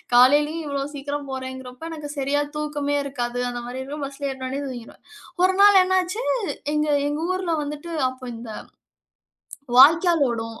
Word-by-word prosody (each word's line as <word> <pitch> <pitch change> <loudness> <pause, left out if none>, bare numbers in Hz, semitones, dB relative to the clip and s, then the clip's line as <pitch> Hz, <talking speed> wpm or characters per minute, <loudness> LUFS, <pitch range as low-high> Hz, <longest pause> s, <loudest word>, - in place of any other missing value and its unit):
காலையிலேயும் 295 +5 +5
இவ்ளோ 280 -1 -2
சீக்கிரம் 285 0 -5
போறேங்கறப்போ, 260 +1 -7
எனக்கு 300 -2 -7
சரியா 285 +2 +1
தூக்கமே 290 -1 -2
இருக்காது. 245 -3 -3
அந்த 240 0 -5
மாரி 255 +1 -5
இருக்கும் 285 +1 -5
பஸ்ல 280 0 -5
ஏறுனோனே 265 +1 -4
தூங்கிடுவேன். 240 -3 -9 0.4
ஒரு 375 0 +4
நாள் 405 -2 +8
என்னாச்சு, 375 +5 0 0.5
எங்க 300 0 +1 0.2
எங்க 295 +2 -3
ஊர்ல 370 -2 -2
வந்துட்டு 295 +3 -6 0.2
அப்போ 255 0 -11
இந்த 230 0 -9 1.3
வாய்க்கால் 325 +1 +6
ஓடும். 225 0 -5
285 Hz, 140 wpm, -23 LUFS, 260-305 Hz, 1.3 s, நாள்